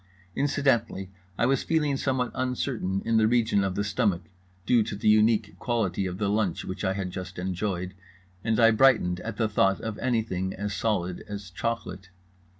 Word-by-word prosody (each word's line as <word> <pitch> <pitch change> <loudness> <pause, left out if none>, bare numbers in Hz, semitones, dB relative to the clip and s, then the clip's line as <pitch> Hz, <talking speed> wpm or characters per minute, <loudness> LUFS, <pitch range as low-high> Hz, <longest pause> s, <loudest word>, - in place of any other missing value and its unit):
Incidentally 135 -9 0 0.3
I - - +2
was 135 +1 +2
feeling 150 -3 +1
somewhat 130 -2 -1
uncertain 125 -7 -2
in 115 -1 +2
the 110 -1 +4
region 110 -4 +2
of 95 -1 -1
the 100 - 0
stomach, 100 -3 0 0.4
due 120 +1 +4
to 110 -1 -3
the 100 - -2
unique 110 0 +3
quality 100 -6 -1
of 90 0 -5
the 100 0 0
lunch 100 -4 0
which 95 +2 -5
I 95 -1 +1
had 95 -2 -3
just 90 -1 -7
enjoyed, 90 0 -3 0.5
and 110 0 +1
I 115 -1 +7
brightened 110 -7 +4
at 115 - -6
the 115 - +2
thought 95 -2 +2
of 110 -2 -5
anything 110 -7 -1
as 100 +1 -3
solid 90 -5 -1
as 100 -2 -7
chocolate. 100 -3 -4
105 Hz, 175 wpm, -27 LUFS, 95-115 Hz, 0.5 s, I